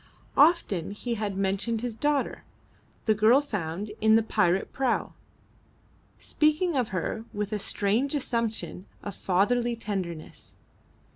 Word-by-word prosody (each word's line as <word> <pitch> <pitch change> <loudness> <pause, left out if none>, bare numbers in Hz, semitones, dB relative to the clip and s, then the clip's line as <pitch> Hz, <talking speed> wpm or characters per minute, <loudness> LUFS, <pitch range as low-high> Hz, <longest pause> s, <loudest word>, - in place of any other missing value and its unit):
Often 285 - +4
he 240 +1 -3
had 205 -3 -3
mentioned 200 +4 0
his 240 -2 -3
daughter, 290 +3 0 0.6
the 220 - +4
girl 220 +5 +5
found 205 - -4
in 220 0 +6
the 225 - +4
pirate 195 -4 +1
prau, 260 -3 0 1.0
speaking 310 +2 +1
of 250 -4 +1
her 190 +5 -3
with 210 +1 -3
a 210 - -1
strange 220 +9 0
assumption 230 -7 -2 0.2
of 205 -3 -6
fatherly 235 +6 +1
tenderness. 185 -8 -5
220 Hz, 125 wpm, -27 LUFS, 195-245 Hz, 1.0 s, in